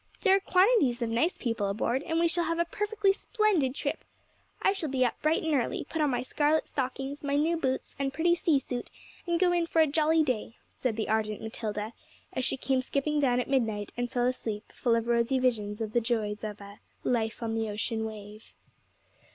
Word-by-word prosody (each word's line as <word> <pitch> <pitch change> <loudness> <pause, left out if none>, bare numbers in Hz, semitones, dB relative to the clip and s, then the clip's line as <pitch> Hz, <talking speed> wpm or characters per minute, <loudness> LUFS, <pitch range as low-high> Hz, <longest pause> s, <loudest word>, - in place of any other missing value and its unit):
There 385 -2 +5
are - - +3
quantities 365 - +3
of 230 - -2
nice 320 +10 +1
people 230 -5 -1
aboard, 235 +6 0
and 325 +1 -1
we 340 - +4
shall 335 +1 0
have 330 +1 -1
a 340 - +2
perfectly 415 +2 +1
splendid 395 - +1
trip. - - -3 0.6
I 390 - +3
shall 335 -6 -3
be 260 -1 +2
up 240 - -2
bright 310 +1 +2
and 320 -1 0
early, 260 -1 0
put 320 - -2
on 300 - +3
my 245 -2 0
scarlet 300 +4 +1
stockings, 270 +2 -3
my 280 0 0
new 315 +4 +2
boots, 265 -5 -2
and 275 -1 0
pretty 340 +4 +2
sea 330 -3 +3
suit, 250 -2 -4 0.4
and 340 -1 +1
go 360 -1 +4
in 345 -1 +1
for 330 - +1
a 320 - +7
jolly 315 +2 +3
day,' 240 -4 -2 0.2
said 250 -4 -2
the 220 - -2
ardent 215 -1 0
Matilda, 220 0 -4 0.4
as 260 - -2
she 265 - +1
came 265 0 +1
skipping 285 +3 0
down 250 -3 +3
at 250 - -2
midnight 225 -7 0
and 245 0 -2
fell 245 -2 +1
asleep 225 -4 -3
full 235 -2 +1
of 230 -1 0
rosy 235 +2 +2
visions 225 -4 0
of 215 -1 -3
the 240 - +3
joys 220 -3 -1
of 210 -1 -5
a 200 0 -11 0.2
Life 230 -1 -1
on 225 -1 -1
the 225 -1 -1
ocean 220 +2 -2
wave. 215 0 -9
255 Hz, 215 wpm, -29 LUFS, 225-320 Hz, 0.6 s, a